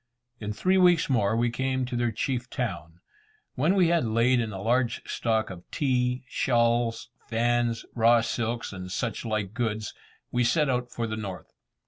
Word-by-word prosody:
In 105 -1 -4
three 185 - +2
weeks 175 -5 +4
more 110 -3 +2
we 120 0 +1
came 130 +1 -1
to 125 0 -5
their 120 -1 +1
chief 120 +2 -2
town. 85 -8 -4 0.5
When 155 +9 +2
we 180 -4 +4
had 170 -1 +3
laid 115 +2 +3
in 115 -2 -2
a 95 - -6
large 120 +3 0
stock 110 -3 0
of 90 -2 -9
tea, 125 -2 0
shawls, 115 -1 +1 0.2
fans, 120 0 0
raw 115 0 +5
silks, 115 -1 -2
and 90 -1 -7
such 115 +3 -3
like 110 -3 -2
goods, 110 -2 -2 0.4
we 125 - +2
set 135 +4 +2
out 125 -1 -1
for 115 - -3
the 110 -1 -4
north. 95 -4 -7
120 Hz, 170 wpm, -27 LUFS, 110-125 Hz, 0.5 s, raw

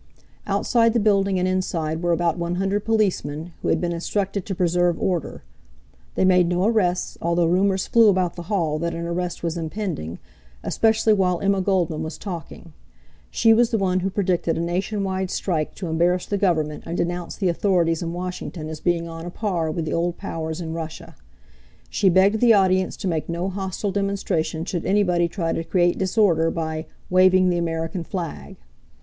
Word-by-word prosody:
Outside 230 -2 +2
the 235 - +2
building 200 -2 +2
and 180 0 +1
inside 165 -4 -1
were 175 -1 +1
about 170 -1 +1
[1?]00 190 +4 -1
policemen, 175 -7 -1
who - - -3
had - - +2
been 175 -1 -1
instructed 195 +3 -2
to 195 - -3
preserve 175 -1 +1
order. 175 -5 -2 0.7
They - - +2
made 180 -2 +4
no 180 +2 +1
arrests, 185 -6 0
although 170 0 +2
rumors 190 +3 +2
flew 230 -1 +5
about 185 -3 +1
the 175 - -6
hall 165 -7 0
that 170 +1 -2
an 170 0 -4
arrest 175 +1 -3
was 170 0 -2
impending, 160 - -4 0.5
especially 220 -1 +2
while 180 -3 +1
Emma 195 -1 +1
Goldman 180 -5 0
was 160 0 -5
talking. 170 -3 -8 0.6
She 225 -1 +4
was 235 +1 +4
the 230 - +1
one 185 -2 +1
who 190 +1 -1
predicted 180 -4 0
a - - -1
nationwide 190 +2 -2
strike 160 -6 -2
to 190 - -6
embarrass 175 +2 +1
the 205 - -2
Government 155 -6 0
and 170 - -3
denounced 175 0 -3
the 190 -3 +2
authorities 170 -2 +1
in 165 -1 -3
Washington 175 -2 -5
as 160 -1 -6
being 170 -1 0
on 165 +1 -7
a - - -3
par 175 -4 -2
with 160 +1 -2
the - - -3
old 175 +1 -1
powers 160 -4 -4
in 160 -2 -4
Russia. 165 -1 -7 0.8
She 195 - +3
begged 195 +4 +4
the 235 -1 +6
audience 185 -1 +2
to - - -4
make 165 -3 -2
no 170 +3 -2
hostile 190 +1 -3
demonstration 185 -5 -1
should 175 -3 -3
anybody 180 -4 +2
try 165 -2 -2
to 165 - -2
create 175 +1 +1
disorder 185 -4 +2
by 160 -1 -3 0.2
"waving 185 0 +5
the 175 - 0
American 165 +1 -2
flag." 170 -1 -6
180 Hz, 180 wpm, -23 LUFS, 165-195 Hz, 0.8 s, the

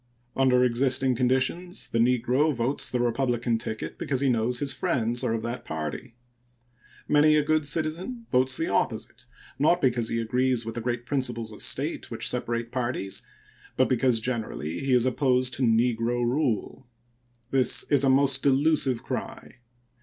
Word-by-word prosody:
Under 130 -2 +3
existing 130 +1 +3
conditions 130 +9 0
the 115 - -1
negro 125 +5 +2
votes 120 +4 -1
the 125 - -1
Republican 120 -1 0
ticket 110 0 -5
because 135 -3 -2
he 140 0 +2
knows 120 +1 0
his 140 +1 -2
friends 120 -8 -1
are 120 -3 0
of 110 - -4
that 120 +1 -4
party. 80 - -6 0.9
Many 150 +1 +4
a 150 - +3
good 155 0 +1
citizen 170 - -3
votes 130 0 +2
the 165 - -1
opposite, 120 +1 -2 0.3
not 155 +5 +3
because 120 -4 +1
he 115 - -1
agrees 125 +1 0
with 115 - -5
the 120 - -5
great 120 0 -3
principles 120 -4 -2
of 105 - -10
state - - -1
which - - -2
separate 115 0 -2
parties, 120 -6 -3 0.6
but 130 - +4
because, 125 -2 +2
generally, 110 - -3
he 135 - -2
is 125 -1 +4
opposed 130 -1 +1
to 130 - -3
negro 120 0 +1
rule. 125 -1 -1 0.6
This 130 -2 +2
is 140 -2 +4
a 135 - +3
most 135 0 +4
delusive 140 -3 +2
cry. - - -6
125 Hz, 160 wpm, -26 LUFS, 115-135 Hz, 0.9 s, Many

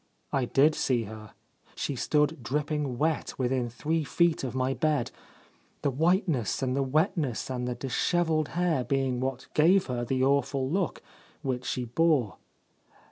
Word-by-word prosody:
I 135 -2 +2
did 145 +5 +4
see 125 -5 0
her. 110 0 -10 0.4
She 140 - -2
stood 150 +3 +1
dripping 145 +1 -2
wet 155 +3 -1
within 125 -1 0
three 155 +7 -1
feet 170 +3 +1
of 130 -1 -4
my 130 +1 +1
bed, 150 -4 0 0.7
the 140 - +2
whiteness 160 - +1
and 130 0 0
the 140 - +1
wetness 150 - 0
and 125 -1 -2
the 125 - -2
dishevelled 155 +5 0
hair 175 -7 +2
being 135 -1 0
what 130 0 -3
gave 180 +5 +4
her 125 -2 -2
the 130 +2 0
awful 135 -1 +1
look 180 +4 -1 0.4
which 125 -2 -2
she 125 - -2
bore. 130 - +1
135 Hz, 150 wpm, -28 LUFS, 125-155 Hz, 0.7 s, did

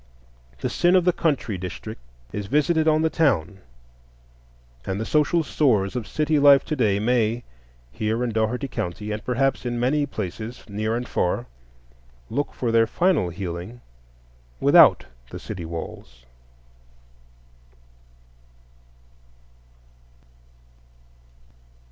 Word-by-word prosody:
The - - 0
sin 175 +1 +2
of 180 -2 +4
the 180 - +4
country 135 - -1
districts 90 -8 -7 0.3
is 105 -1 -4
visited 155 +5 +2
on 155 0 +3
the 160 - +2
town, 105 - +1 1.2
and 95 +8 -3
the 110 - -3
social 155 +4 +2
sores 115 -10 +1
of 120 -3 -3
city 155 0 +1
life 140 -1 +6
to 155 - -2
day 110 -7 +2
may, 115 +1 +1 0.5
here 110 - -1
in 120 - -1
Dougherty 110 +5 -1
County, 105 -1 -4
and 105 0 -4
perhaps 135 +2 0
in 120 -1 -3
many 145 +4 +1
places 110 +1 -6
near 110 +2 -2
and 125 - -5
far, 90 - -1 0.9
look 145 +5 -1
for 120 -3 -2
their 115 0 +4
final 175 - +1
healing 90 +5 -6 0.8
without - - +6 0.2
the - - -7
city 85 - -7
walls. 80 -7 -8
120 Hz, 115 wpm, -23 LUFS, 100-145 Hz, 1.2 s, life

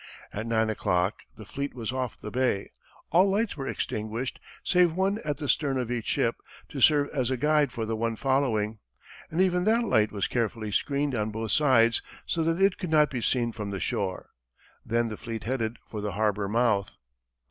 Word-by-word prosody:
At 110 +3 -4
nine 110 -1 +2
o'clock 90 -1 0 0.2
the 110 - -10
fleet 140 +6 -4
was 115 -2 -3
off 130 -2 -3
the 105 - -7
bay, 125 -5 0 0.4
all 185 +4 +5
lights 210 +3 0
were 135 -3 -5
extinguished 110 +4 -3 0.2
save 180 -3 +3
one 195 +3 +1
at 150 -1 -2
the 145 -1 -4
stern 135 -1 +1
of 125 -2 -2
each 120 -3 -3
ship - - +1 0.3
to - - -5
serve 145 -2 +5
as 130 -4 0
a 130 - 0
guide 150 0 +3
for 115 - -3
the 110 0 -2
one 115 +1 -1
following, 115 -5 0 0.5
and 160 - -3
even 180 -1 +3
that 230 +2 +3
light 110 - +2
was 100 -2 -1
carefully 115 -2 -2
screened 140 +6 0
on 110 -2 0
both 110 0 -3
sides 120 -6 +4 0.2
so 165 - 0
that 165 +2 +1
it 195 -1 +3
could 180 - -4
not 150 -1 +4
be 125 -3 -3
seen 120 0 +1
from 105 -3 -5
the 100 -1 -4
shore. 95 -1 -3 0.5
Then 115 0 0
the 110 - -6
fleet 115 -1 -6
headed 115 -2 -2
for 105 - -5
the 105 -2 -3
harbor 105 -1 0
mouth. 110 -2 +1
120 Hz, 200 wpm, -27 LUFS, 110-150 Hz, 0.5 s, all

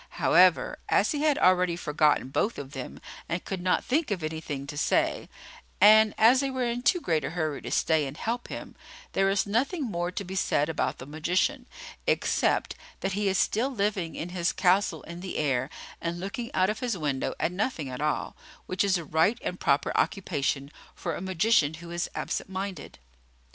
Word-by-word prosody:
However, - - +4
as - - +3
he 295 -2 -2
had 300 -2 +3
already 180 -1 +3
forgotten 150 -5 +1
both 205 - 0
of 140 -1 -7
them 130 -2 -7 0.3
and 170 +1 -3
could 190 -2 -4
not 180 0 +1
think 295 +3 +1
of 190 -6 -2
anything 155 -3 -4
to 145 - -7
say, 145 - +1 0.5
and 215 +1 +7
as 235 +4 +6
they 275 0 0
were 260 -2 -1
in 240 +1 -2
too 320 +8 +3
great 160 - 0
a - - -2
hurry 155 -3 -2
to - - -6
stay 155 -3 +2
and 135 +3 -8
help 235 +5 -3
him, - - -8 0.4
there 195 0 +2
is 195 0 +1
nothing 260 - 0
more 175 -7 -2
to 200 - -4
be 190 0 -7
said 155 -5 +1
about 160 - -1
the 130 - -9
magician, 180 - -1 0.4
except - - +1 0.3
that 195 0 -1
he 205 +1 0
is 195 0 +2
still 235 +6 +1
living 200 -8 -1
in 170 - -5
his 175 -1 0
castle 180 -3 +2
in 170 0 -8
the 185 +1 -5
air 135 -3 0 0.3
and 170 +1 -3
looking 200 +6 -5
out 185 +2 +3
of 215 - -6
his 240 -5 -2
window 145 -5 -2
at - - 0
nothing 180 - -2
at 130 +1 -6
all, 150 0 -1 0.3
which 185 +2 0
is 195 -2 +2
a 170 - -6
right 160 +10 +2
and 180 - -4
proper 140 +1 +1
occupation 145 -7 -1 0.2
for 170 - -3
a - - -6
magician 185 -4 +2
who 170 +1 -10
is 175 +1 -2
absent - - -3
minded. 190 0 -5
180 Hz, 195 wpm, -27 LUFS, 155-210 Hz, 0.5 s, and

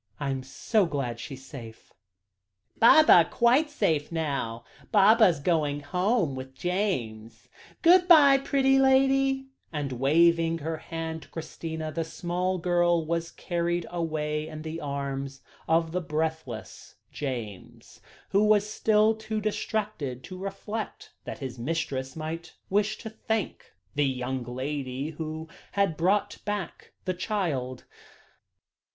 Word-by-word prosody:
I 140 -1 -1
am 135 -1 -2
so 185 - 0
glad 130 -7 -3
she 135 +3 -6
is 135 +1 -14
safe." 115 -6 -11 0.9
"Baba 230 - +7
quite 255 +6 +3
safe 165 - 0
now; 140 -8 -2 0.3
Baba 210 -4 +6
going 150 -4 +1
home 180 - +1
with 130 0 -8
James; 130 - -3 0.4
good 355 +1 +6
bye, 285 -6 +8
pretty 270 -1 +3
lady," 270 0 +3 0.2
and 145 -4 -3
waving 165 +5 +3
her 160 +1 -4
hand 160 0 -5
to - - -14
Christina, 160 -1 -5
the 165 +1 -2
small 180 +2 -2
girl 175 -1 +2
was 170 +1 -1
carried 175 -1 -2
away 155 -3 -2
in 155 -1 -8
the 160 +1 -5
arms 140 -1 -4 0.3
of 165 0 +2
the 180 +2 -1
breathless 155 - -4 0.2
James, 120 -9 -7 0.3
who 200 +2 +3
was 210 -1 +4
still 215 0 +3
too 220 0 -4
distracted 210 - -3
to 185 - -8
reflect 200 +3 -5
that - - -5
his 130 -3 -6
mistress 130 -1 -3
might 165 +2 -6 0.2
wish 210 +2 +1
to 220 - -7
thank 220 -1 -3 0.2
the 145 -1 +2
young 130 0 -2
lady 135 +2 -4
who 160 0 -6 0.3
had 200 -5 +1
brought 200 +5 +1
back 205 -4 -5
the 185 - 0
child. 165 - -2
165 Hz, 130 wpm, -27 LUFS, 140-205 Hz, 0.9 s, bye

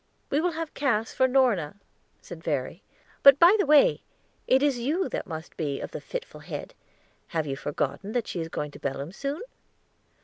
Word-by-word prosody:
"We 290 - +2
will 355 0 0
have 325 -1 -5
Cass 230 -6 0
for 260 - +3
Norna," 245 - +2 0.5
said 165 -2 -10
Verry; 150 +3 -2 0.4
"but, 275 0 +9
by 345 +6 +7
the 400 - +2
way, 295 -1 +5 0.5
it 265 +2 +4
is 280 -4 +2
you 315 +10 0
that - - -4
must 160 -2 -7
be 145 -4 -2
of - - -6
the - - -6
fitful - - -7
head; - - -7 0.5
have 160 -3 -2
you 135 -2 -3
forgotten 145 +8 -3
that 245 -3 0
she 175 - -5
is 165 - -5
going 150 -2 -4
to - - -12
Belem 140 +3 -4
soon?" 280 - -4
225 Hz, 190 wpm, -27 LUFS, -, 0.5 s, but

